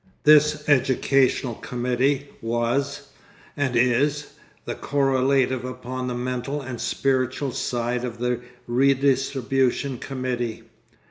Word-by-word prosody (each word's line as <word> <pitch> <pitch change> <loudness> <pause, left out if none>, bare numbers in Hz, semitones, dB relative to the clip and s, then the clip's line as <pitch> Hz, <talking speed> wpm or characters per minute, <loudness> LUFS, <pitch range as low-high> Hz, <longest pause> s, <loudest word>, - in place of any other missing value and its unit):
This 150 0 +5
educational 130 -2 +2
committee 125 +4 -1
was, 120 +5 -1 0.5
and 135 -3 -1
is, 135 +5 +2 0.3
the - - -3
correlative 135 -2 +1
upon 125 0 -5
the 125 - -2
mental 125 +3 -3
and 125 -4 -6
spiritual 130 +1 0
side 120 0 -2
of 120 -2 -4
the 125 0 -1 0.3
redistribution 135 0 +1
committee. 125 -4 -3
130 Hz, 95 wpm, -24 LUFS, 125-140 Hz, 0.5 s, This